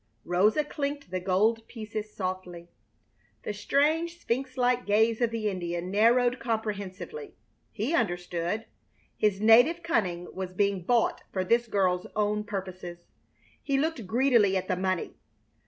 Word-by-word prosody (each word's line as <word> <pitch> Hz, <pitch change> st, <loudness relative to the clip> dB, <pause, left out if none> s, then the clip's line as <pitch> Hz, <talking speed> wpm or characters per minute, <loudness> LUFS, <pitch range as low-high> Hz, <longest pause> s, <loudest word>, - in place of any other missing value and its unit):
Rosa 205 Hz, -, +3 dB
clinked 285 Hz, -5 st, -4 dB
the 185 Hz, -, -1 dB
gold 215 Hz, +5 st, +1 dB
pieces 215 Hz, -2 st, -6 dB
softly. 185 Hz, -3 st, -5 dB, 0.7 s
The 210 Hz, -, -3 dB
strange, 310 Hz, +10 st, +1 dB
sphinx 255 Hz, -1 st, -3 dB
like 250 Hz, -1 st, +1 dB
gaze 220 Hz, +3 st, +3 dB
of 240 Hz, -, +3 dB
the 225 Hz, -2 st, -2 dB
Indian 175 Hz, -2 st, -3 dB
narrowed 240 Hz, +4 st, +3 dB
comprehensively. 220 Hz, -, -4 dB, 0.4 s
He 230 Hz, +8 st, -2 dB
understood. 175 Hz, -, -1 dB, 0.5 s
His 210 Hz, -2 st, +1 dB
native 245 Hz, +11 st, +5 dB
cunning 180 Hz, -, 0 dB
was 185 Hz, -1 st, -5 dB
being 200 Hz, -2 st, 0 dB
bought 240 Hz, +1 st, +2 dB
for 185 Hz, -, -1 dB
this 235 Hz, +5 st, +2 dB
girl's 185 Hz, -4 st, +1 dB
own 210 Hz, 0 st, 0 dB
purposes. 185 Hz, -4 st, -6 dB, 0.6 s
He 275 Hz, -1 st, 0 dB
looked 295 Hz, -, -1 dB
greedily 230 Hz, -4 st, +3 dB
at 185 Hz, 0 st, -3 dB
the -, -, +1 dB
money. 185 Hz, -1 st, -2 dB
210 Hz, 135 wpm, -28 LUFS, 185-245 Hz, 0.7 s, native